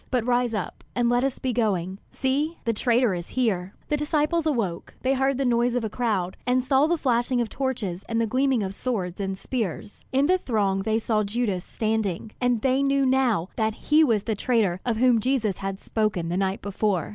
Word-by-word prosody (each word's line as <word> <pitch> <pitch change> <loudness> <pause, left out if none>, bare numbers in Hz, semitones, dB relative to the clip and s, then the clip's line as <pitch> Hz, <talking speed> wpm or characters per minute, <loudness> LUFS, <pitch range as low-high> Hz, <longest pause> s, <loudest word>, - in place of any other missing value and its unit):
But 245 -3 0
rise 245 -2 +1
up 190 -6 -5
and 240 -1 +2
let 245 +1 +2
us 270 -1 -1
be 255 -1 -2
going. 195 -5 0
See, 290 +5 -1
the 230 - +1
traitor 240 -1 +2
is 175 -1 -5
here!" 195 -6 0
The 295 - +1
disciples 305 +2 0
awoke; 220 - -2
they 265 +1 +2
heard 270 0 +1
the 275 - 0
noise 240 0 +2
of 245 - 0
a 220 - -3
crowd, 205 -8 -1
and 250 +1 +2
saw 270 +3 +3
the 345 +1 +1
flashing 245 -2 +1
of 235 -2 0
torches 225 -9 -3
and 230 0 0
the 230 - +2
gleaming 255 0 +1
of 190 0 -4
swords 195 -6 -3
and 195 -1 -2
spears. 205 -4 -4
In 270 +1 +3
the 370 +4 +3
throng 200 - 0
they 220 +2 +1
saw 220 -1 +1
Judas 205 -3 -1
standing, 220 -2 -2
and 245 -3 +2
they 265 +1 +3
knew 275 0 +2
now 255 -9 +2
that 220 -1 0 0.2
he 310 +1 +7
was 225 -8 +2
the 225 - -1
traitor 210 -5 +1
of 230 -2 +1
whom 245 -1 +4
Jesus 230 -6 0
had 195 0 -4
spoken 205 -6 -1
the 175 - -1
night 195 0 -1
before. 200 -3 -1
230 Hz, 210 wpm, -25 LUFS, 200-260 Hz, 0.2 s, he